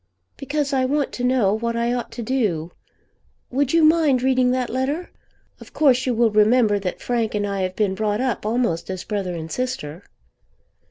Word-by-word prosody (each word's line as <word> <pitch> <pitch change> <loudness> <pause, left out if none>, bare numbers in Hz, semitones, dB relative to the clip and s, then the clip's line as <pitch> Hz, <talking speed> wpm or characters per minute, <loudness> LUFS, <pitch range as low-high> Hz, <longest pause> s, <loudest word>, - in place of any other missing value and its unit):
"Because 285 0 -2
I 260 -1 +2
want 280 +2 0
to 245 - -5
know 250 -6 +2
what 230 +2 -2
I 235 +1 0
ought 245 -2 -4
to 235 - -5
do. 205 -10 -1 0.8
Would 270 +1 0
you 330 -1 +4
mind 310 -5 +4
reading 255 -1 +3
that 255 -1 -1
letter? 275 +8 -2 0.5
Of - - -14
course 260 -4 +3
you 250 - +1
will 230 -1 +3
remember 215 0 +4
that 185 -2 -4
Frank 230 -3 -1
and 205 0 0
I 200 -1 -2
have 185 0 -2
been 205 -3 +1
brought 210 +1 -1
up 255 -3 -1
almost 215 -7 -1
as 185 -1 -4
brother 195 -4 -3
and 160 -1 -6
sister." 185 -8 -4
240 Hz, 185 wpm, -22 LUFS, 205-260 Hz, 0.8 s, you